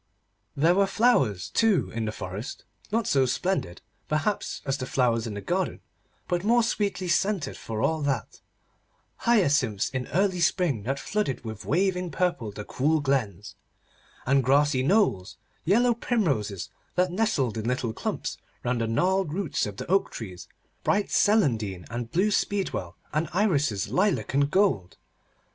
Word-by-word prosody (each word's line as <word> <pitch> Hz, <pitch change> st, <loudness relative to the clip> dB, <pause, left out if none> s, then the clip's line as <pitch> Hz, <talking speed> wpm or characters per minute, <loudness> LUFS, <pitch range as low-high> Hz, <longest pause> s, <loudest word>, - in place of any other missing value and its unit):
There 165 Hz, +5 st, +4 dB
were 195 Hz, +1 st, +3 dB
flowers, 165 Hz, -, +2 dB
too, 210 Hz, -, +2 dB
in 115 Hz, -1 st, -2 dB
the 105 Hz, -, -2 dB
forest, 105 Hz, +4 st, -7 dB, 0.3 s
not 225 Hz, +1 st, +1 dB
so 135 Hz, -6 st, +3 dB
splendid, 150 Hz, -, -2 dB, 0.2 s
perhaps, 155 Hz, +7 st, -1 dB
as 135 Hz, +1 st, -1 dB
the 130 Hz, -, -4 dB
flowers 120 Hz, -4 st, +1 dB
in 105 Hz, -, -5 dB
the 100 Hz, -, -5 dB
garden, -, -, -1 dB, 0.5 s
but 175 Hz, 0 st, -1 dB
more 235 Hz, +3 st, +4 dB
sweetly 200 Hz, -5 st, -1 dB
scented 195 Hz, -1 st, 0 dB
for 110 Hz, -1 st, -4 dB
all 160 Hz, -1 st, +1 dB
that; 135 Hz, -6 st, -2 dB, 0.8 s
hyacinths 145 Hz, -, +2 dB
in 130 Hz, -1 st, -3 dB
early 185 Hz, +2 st, +1 dB
spring 170 Hz, -, +1 dB
that 135 Hz, +2 st, -1 dB
flooded 165 Hz, -, -2 dB
with 110 Hz, -1 st, -7 dB
waving 180 Hz, +2 st, +1 dB
purple 170 Hz, -11 st, -1 dB
the 105 Hz, +1 st, -8 dB
cool 155 Hz, +4 st, +1 dB
glens, 115 Hz, -, -1 dB, 0.7 s
and 135 Hz, +1 st, +3 dB
grassy 140 Hz, +1 st, +3 dB
knolls; 140 Hz, -, +1 dB, 0.3 s
yellow 235 Hz, +7 st, +4 dB
primroses 140 Hz, -, -1 dB, 0.3 s
that 180 Hz, 0 st, +2 dB
nestled 175 Hz, -, 0 dB
in 110 Hz, -1 st, -4 dB
little 125 Hz, -2 st, -1 dB
clumps -, -, -4 dB, 0.2 s
round 120 Hz, -1 st, 0 dB
the 115 Hz, -, 0 dB
gnarled 180 Hz, +8 st, +1 dB
roots 175 Hz, -, -1 dB
of 100 Hz, -1 st, -7 dB
the -, -, -5 dB
oak 195 Hz, +2 st, +2 dB
trees; 95 Hz, -6 st, -8 dB, 0.4 s
bright 205 Hz, 0 st, +1 dB
celandine, 115 Hz, -, +2 dB
and 120 Hz, 0 st, -4 dB
blue 195 Hz, +5 st, +2 dB
speedwell, 190 Hz, -, -1 dB, 0.2 s
and 155 Hz, +1 st, 0 dB
irises 145 Hz, -, +1 dB
lilac 190 Hz, -5 st, +1 dB
and 140 Hz, +1 st, +3 dB
gold. 165 Hz, -, +1 dB
145 Hz, 150 wpm, -26 LUFS, 115-195 Hz, 0.8 s, There